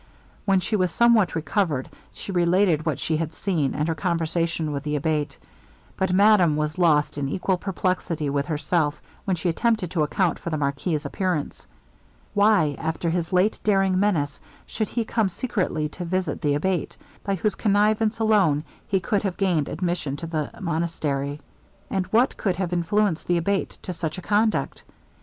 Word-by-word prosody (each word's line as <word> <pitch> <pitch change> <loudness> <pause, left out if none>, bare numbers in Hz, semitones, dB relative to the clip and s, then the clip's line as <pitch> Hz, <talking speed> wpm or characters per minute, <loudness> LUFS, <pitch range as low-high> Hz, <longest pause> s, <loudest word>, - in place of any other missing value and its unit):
When 195 -2 +4
she 215 +5 0
was 185 -3 +2
somewhat 230 0 +3
recovered, 160 - 0 0.2
she - - -7
related 175 -2 +2
what 155 - 0
she 160 - 0
had 160 0 -3
seen, 165 -9 -1
and 150 +2 0
her 165 - +1
conversation 165 -2 -1
with 140 -1 -3
the 150 +1 -2
Abate. 150 -1 -1 0.6
But 190 -1 0
madame 190 -4 +5
was 150 +3 -2
lost 150 -4 +3
in 140 -1 -1
equal 185 +3 0
perplexity 180 -5 -1
with 140 0 -1
herself, 150 -1 0 0.3
when 190 -3 +1
she 170 +1 -3
attempted 200 +1 +1
to 165 - 0
account 170 +3 +1
for - - -5
the 155 - -1
marquis's 145 +2 -1
appearance. 175 0 -2 0.7
Why, 205 -8 +3
after 160 +1 -1
his 170 -1 -2
late 185 +4 +2
daring 195 -3 +2
menace, 160 -9 0 0.3
should 215 -1 -2
he 235 -2 -2
come 220 -3 +1
secretly 185 -7 -1
to 175 - -7
visit 180 -3 -2
the 145 -1 +1
Abate, 180 +2 -1 0.3
by 195 -1 0
whose 200 +3 0
connivance 215 +1 +2
alone 205 -10 +3 0.2
he 195 - +1
could 200 +2 0
have 195 -4 -3
gained 175 -7 +1
admission 170 -4 -2
to 165 - -6
the 155 -3 -2
monastery? 155 -5 -2 0.5
And 190 -2 -1
what 240 +4 +2
could 190 -4 0
have 180 -1 -2
influenced 175 +1 +1
the 175 - +2
Abate 195 +4 -1
to 180 - -4
such 160 -1 -4
a 185 - -7
conduct? 215 +3 +1
175 Hz, 170 wpm, -24 LUFS, 155-195 Hz, 0.7 s, madame